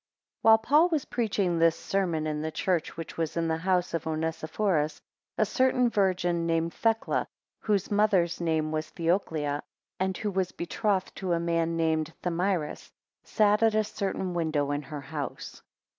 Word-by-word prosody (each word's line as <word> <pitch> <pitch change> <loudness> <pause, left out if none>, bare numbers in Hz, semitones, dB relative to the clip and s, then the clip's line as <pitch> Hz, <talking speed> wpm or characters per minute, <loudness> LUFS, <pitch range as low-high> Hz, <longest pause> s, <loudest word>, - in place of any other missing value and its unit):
WHILE 220 -2 +7
Paul 295 +10 +4
was 310 -5 0
preaching 200 -7 0
this 165 0 +4
sermon 175 -6 -1
in 150 -1 -2
the 160 - -2
church 170 +1 -1
which 165 - -7
was 165 0 -2
in 165 0 +1
the 160 0 0
house 180 +1 0
of 165 -1 -2
Onesiphorus, 160 +1 -1 0.4
a 215 - +3
certain 250 +2 +2
virgin 180 -4 +1
named 165 0 0
Thecla 225 -1 0 0.3
(whose 205 -3 0
mother's 195 -5 +2
name 160 -2 0
was 155 0 -2
Theoclia, 160 -4 -1 0.4
and 190 0 0
who 210 - -2
was 190 -1 -1
betrothed 190 +2 -1
to 185 -2 -1
a 170 - +1
man 165 0 0
named 160 -1 0
Thamyris) 175 -2 -1 0.3
sat 210 0 +2
at 225 -1 +4
a 215 - +3
certain 190 -3 -3
window 155 -4 0
in 145 0 -1
her 150 -1 -7
house. 145 +1 -6
170 Hz, 160 wpm, -28 LUFS, 160-200 Hz, 0.4 s, WHILE